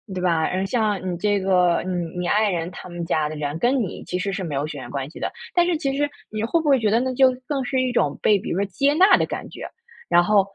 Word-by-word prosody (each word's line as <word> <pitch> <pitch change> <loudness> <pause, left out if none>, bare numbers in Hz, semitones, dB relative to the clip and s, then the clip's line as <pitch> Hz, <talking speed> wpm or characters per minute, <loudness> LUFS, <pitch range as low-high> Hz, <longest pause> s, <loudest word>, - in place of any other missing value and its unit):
对 - - -2
吧， 170 -3 +1
呃， 190 +1 -1
像 215 -2 0
你 175 - -2
这 205 +2 +1
个， 180 -2 +3
嗯， 175 -3 -3
你 175 - -2
爱 210 0 +3
人 170 -1 -2
他 180 - -10
们 175 -1 -5
家 155 -2 0
的 155 - -6
人 150 +1 -4
跟 255 +2 +2
你 190 - -6
其 180 - -3
实 195 +1 -2
是 190 -1 -3
没 150 -5 -4
有 140 +2 -1
血 150 -2 -6
缘 - - -8
关 135 -1 -4
系 - - -11
的， - - -2 0.2
但 350 - +4
是 340 -3 +1
其 275 -4 -2
实 290 +1 0 0.2
你 215 0 -3
会 330 +9 +1
不 315 - -3
会 270 -3 +5
觉 215 -2 +1
得 225 +3 +3
那 260 0 -1
就 265 +1 +5 0.2
更 275 -3 -1
是 255 +1 0
一 255 -1 0
种 145 -12 0
被 205 -2 +3
比 - - -7
如 175 - -1
说 200 - +1
接 275 +10 +1
纳 375 +4 +6
的 - - +1
感 - - -5
觉， - - -8 0.4
然 175 0 +6
后， 205 +1 +4
195 Hz, 315 characters per minute, -23 LUFS, 175-250 Hz, 0.4 s, 纳